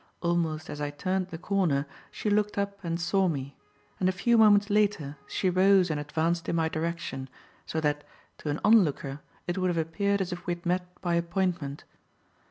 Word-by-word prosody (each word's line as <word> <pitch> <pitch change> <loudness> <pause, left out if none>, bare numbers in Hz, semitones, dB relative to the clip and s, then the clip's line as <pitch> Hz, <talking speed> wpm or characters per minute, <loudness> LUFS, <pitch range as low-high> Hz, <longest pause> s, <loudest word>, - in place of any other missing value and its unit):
Almost 165 -2 0
as 145 - -6
I 145 - -1
turned 185 +5 -1
the 170 - -7
corner, 170 -6 +1 0.2
she 210 - -2
looked 210 0 +1
up 200 0 -2
and 170 0 -2
saw 190 +3 +2
me; 140 -4 -3 0.4
and 185 - +3
a - - +3
few 215 +6 +2
moments 205 -2 +5
later, 200 -9 +1
she 190 - -1
rose 185 -1 +4
and 150 - -1
advanced 160 +3 -1
in - - 0
my 160 -1 +1
direction, 155 -5 -3 0.4
so 160 - -1
that, 150 -1 0 0.4
to 150 - -4
an 145 - -1
onlooker 150 -10 +3 0.3
it 175 +2 -2
would 185 - +1
have 175 - -1
appeared 200 +5 0
as 185 -1 -2
if 175 - -9
we 175 - +1
had 170 - -19
met 180 +1 0
by 175 -1 0
appointment. 170 -4 -1
175 Hz, 190 wpm, -28 LUFS, 155-195 Hz, 0.4 s, moments